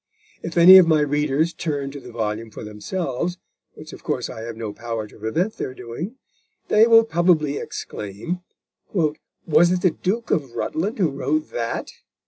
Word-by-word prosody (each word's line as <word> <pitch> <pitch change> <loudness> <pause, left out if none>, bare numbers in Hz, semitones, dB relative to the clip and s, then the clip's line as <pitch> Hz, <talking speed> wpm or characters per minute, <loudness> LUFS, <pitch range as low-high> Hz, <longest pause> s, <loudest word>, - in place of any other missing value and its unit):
If 165 0 -6
any 185 +3 +10
of 180 - +5
my 155 -2 +4
readers 150 +2 +1
turn 145 -4 -3
to 140 - -8
the 125 - -11
volume 110 0 -3
for 110 - -9
themselves, 140 - -3 0.4
which, - - -11
of - - -12
course, - - -2
I 110 - -8
have 115 0 -7
no 110 -3 -5
power 115 -1 -4
to 105 - -16
prevent 165 - -1
their 130 - -4
doing, 150 - -6 0.5
they 220 +2 +6
will 225 -1 +7
probably 165 -6 +2
exclaim: 105 - -5 0.5
"Was 160 0 +1
it 180 -1 0
the 185 - +5
Duke 210 +8 -2
of 135 -7 0
Rutland 195 +8 -2
who 175 -8 +2
wrote 150 +3 -1
_that? 115 -1 -3
150 Hz, 170 wpm, -22 LUFS, 115-175 Hz, 0.5 s, any